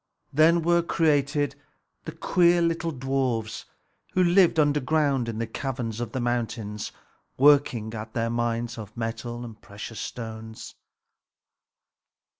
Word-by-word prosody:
Then 165 +3 +5
were 170 +1 +4
created 145 -3 +1 0.5
the - - -4
queer 175 -1 +3
little 165 0 0
dwarfs, 130 -6 -2 0.5
who 185 - +3
lived 175 -1 +4
underground 145 -3 +2
in 110 - -4
the 115 - -1
caverns 120 -1 -4
of 120 -2 -4
the 130 - -3
mountains, 115 -3 -2 0.5
working 135 -6 +4
at 110 0 -7
their 115 0 0
mines 120 0 -2
of 105 0 -10
metal 120 +1 -4
and 110 -3 -11
precious 100 +2 -8
stones. 110 -1 -7
120 Hz, 120 wpm, -26 LUFS, 115-150 Hz, 0.5 s, Then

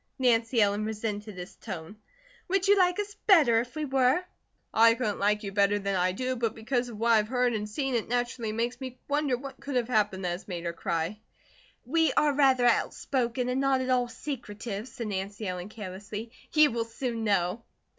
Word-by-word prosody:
Nancy 235 -2 +2
Ellen 205 +1 +1
resented 215 -2 -4
his 180 0 -8
tone. 185 -3 -7 0.5
"Would 385 +1 +1
you 405 - +7
like 360 -1 +3
us 410 0 -3
better 295 - +6
if 245 +4 -9
we 310 -1 -2
were?" 265 +4 +2 0.5
"I 230 +1 +6
couldn't 220 -4 -2
like 210 +1 +1
you 200 - -4
better 200 +1 +3
than 200 -1 -2
I 185 0 +2
do, 255 +7 -2
but 230 -2 -1
because 245 +2 -1
of 225 - -8
what 230 +2 +2
I 225 - +7
have 215 0 +1
heard 250 0 +1
and 210 -1 -3
seen, 270 +4 -2
it 235 -3 0
naturally 240 -2 -1
makes 235 +4 -2
me 255 -1 -6
wonder 290 -3 +1
what 270 +1 -9
could 280 -1 -5
have 245 -1 +1
happened 205 -5 +1
that - - +1
has 175 +2 -6
made 175 -3 -5
her 170 - -2
cry." 165 +4 -2 0.7
"We 320 +5 +2
are 295 -1 +3
rather 265 -3 +4
outspoken, 245 +1 +1
and 255 +2 0
not 275 -1 +3
at 255 0 -1
all 250 -1 +2
secretive," 230 -4 -6
said 235 -1 -6
Nancy 200 +1 -4
Ellen, 180 +1 -4
carelessly, 210 +2 -7 0.2
"you 305 -1 +5
will 230 0 -1
soon 230 0 -4
know." 200 0 +1
230 Hz, 205 wpm, -28 LUFS, 205-260 Hz, 0.7 s, you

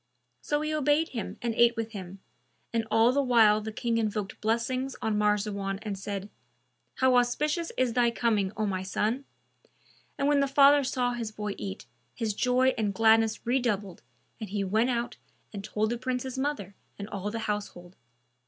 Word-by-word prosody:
So 295 0 -1
he 305 0 -2
obeyed 305 +2 +2
him 230 -4 -5
and 235 -1 0
ate 235 +1 +4
with 225 -1 -3
him, 190 -2 -8 0.5
and 225 -1 0
all 225 +2 +4
the 280 +2 +2
while 225 -5 +5
the 220 +1 -5
King 230 +1 -1
invoked 210 -2 -3
blessings 250 +4 -1
on 220 -1 -1
Marzawan 205 -2 0
and 210 -2 -3
said, 195 0 -5 0.7
"How 260 -1 +4
auspicious 300 +7 0
is 255 -2 +1
thy 240 -1 +3
coming, 220 -5 0
O 215 - 0
my 190 -2 -2
son!" 215 +8 -1 0.9
And 280 - +1
when 290 -1 +4
the 275 - +2
father 280 +1 +6
saw 250 -1 0
his 230 -2 -4
boy 210 -1 -4
eat, 195 0 -6 0.3
his 225 -3 -2
joy 250 +4 +3
and 205 -3 -1
gladness 225 +1 +3
redoubled, 215 -7 -1 0.4
and 215 -4 -6
he 200 0 -1
went 220 +6 +1
out 240 -1 -2 0.4
and 200 -1 -6
told 215 +1 -1
the 240 - -2
Prince's 255 0 -3
mother 275 -6 -3 0.2
and 200 - -6
all 200 -1 -4
the 230 - -4
household. 205 -5 -4
225 Hz, 175 wpm, -28 LUFS, 210-255 Hz, 0.9 s, father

